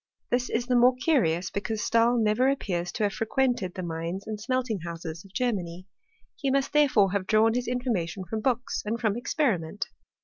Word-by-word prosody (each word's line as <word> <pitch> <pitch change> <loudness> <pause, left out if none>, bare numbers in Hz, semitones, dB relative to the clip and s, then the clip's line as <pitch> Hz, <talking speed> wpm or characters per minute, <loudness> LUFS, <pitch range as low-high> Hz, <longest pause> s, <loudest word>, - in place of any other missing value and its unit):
Th» 245 0 +1
IB 230 - 0
the 250 - +2
more 250 +1 +5
curious, 205 - +1
because 215 +2 -2
Stahl 235 +1 +3
never 225 +4 +3
appears 180 -10 -2
to 220 - -2
have 205 0 +1
frequented 225 -3 0
the 185 - -4
mines 170 +3 -4
and 215 -1 -5
smelting 250 -3 -1
ho 170 0 -4
uses 165 0 -7
of 195 - -17
Germany. 185 -7 -2 0.5
He 280 -4 -2
must, 275 +1 +1
therefore, 260 -10 +4
have 195 -1 -1
drawn 225 +1 +4
his 245 0 -1
in 250 +1 0
formation 190 -7 -2
from 220 +4 -3
books 255 +2 -1
and 225 +2 -2
from 215 -3 +1
experiment. 220 - -1
220 Hz, 195 wpm, -27 LUFS, 185-250 Hz, 0.5 s, more